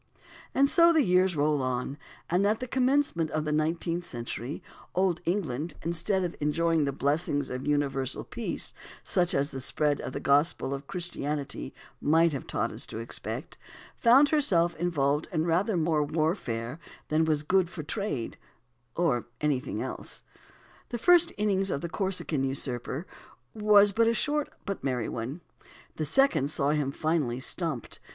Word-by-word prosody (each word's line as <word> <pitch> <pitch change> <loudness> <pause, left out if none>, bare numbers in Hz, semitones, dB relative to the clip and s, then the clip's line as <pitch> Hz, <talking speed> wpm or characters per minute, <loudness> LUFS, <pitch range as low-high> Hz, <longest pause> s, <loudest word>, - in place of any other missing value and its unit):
And 275 +1 +5
so 335 +3 +6
the 320 -3 +4
years 180 -2 +3
rolled 150 -1 +2
on; 130 +1 -2 0.3
and 185 +4 +2
at 215 +1 +1
the 255 - -3
commencement 255 - +1
of 155 0 -2
the 150 - -1
nineteenth 165 +3 0
century, 120 0 -5 0.3
old 185 -2 +1
England, 165 -4 -2
instead 170 +4 0
of 175 - -3
enjoying 160 +1 +1
the 140 - 0
blessings 145 0 0
of 125 +2 -4
universal 140 -3 0
peace, - - -4 0.3
such 175 -1 +1
as 140 +2 +1
the 135 - -5
spread 145 +2 0
of - - -6
the - - -3
Gospel 140 0 +2
of 140 0 -6
Christianity 150 -6 -3 0.3
might 160 +2 +4
have 135 - -5
taught - - -1
us - - -5
to - - -7
expect, 115 +2 -6 0.4
found 260 +5 +6
herself 180 - +3
involved 150 -3 0
in 160 -2 0
rather 180 +4 +1
more 160 -2 +2
warfare 145 - -2 0.3
than 155 +1 +3
was 155 -2 +1
good 185 +2 +2
for 170 -3 -7
trade, 150 - -3 0.6
or 135 -10 +1
anything 145 -4 -1
else. - - -6 0.7
The 240 - -3
first 345 +6 +5
"innings" 195 -2 +1
of 140 - -2
the 170 - -4
Corsican 185 -6 -1
usurper 135 +2 -2 0.5
was 205 -1 +5
a 230 0 +4
short 295 +4 0 0.2
but 200 -2 -4
merry 125 -4 -1
one; 125 +9 -5 0.6
the 155 - -1
second 155 - +3
saw 145 -1 +1
him 145 -3 0
finally 145 -5 0
"stumped." 150 - -3
160 Hz, 155 wpm, -28 LUFS, 140-190 Hz, 0.7 s, so